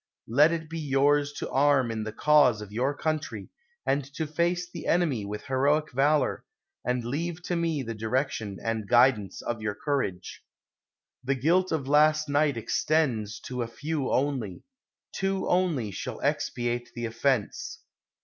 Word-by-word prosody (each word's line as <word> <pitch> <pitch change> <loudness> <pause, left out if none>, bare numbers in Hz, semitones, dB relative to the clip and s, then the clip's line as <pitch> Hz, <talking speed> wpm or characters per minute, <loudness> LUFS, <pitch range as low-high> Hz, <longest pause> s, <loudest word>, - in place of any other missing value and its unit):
Let 145 +8 +5
it 165 -1 -3
be 165 +1 -5
yours 145 0 +2
to - - -5
arm 135 -3 +3
in 110 -1 -3
the 110 - -4
cause 145 -4 +4
of 105 -1 -9
your 130 +6 0
country, 155 -10 -3 0.4
and 140 +1 +1
to 160 - -1
face 170 +3 0
the 175 -2 -8
enemy 150 - +1
with 105 +1 -6
heroic 145 +4 +1
valor; 145 +2 +2 0.4
and 125 -1 -1
leave 165 +7 -3
to 175 - -2
me 165 -4 0
the 115 -1 -4
direction 110 -2 -2
and 110 -2 -2
guidance 120 -6 +3
of 115 -2 -3
your 105 -2 -2
courage. 105 -10 -3 0.8
The 135 +2 0
guilt 175 +8 +2
of 150 -5 -1
last 155 +1 +4
night 145 -2 +2
extends 115 -3 0
to 125 -1 -5
a 120 - -2
few 145 +4 -3
only; 130 -8 -1 0.5
two 195 0 -1
only 165 - +1
shall - - -5
expiate 120 0 -1
the 120 -1 -3
offense. 115 0 -1
135 Hz, 155 wpm, -27 LUFS, 115-155 Hz, 0.8 s, Let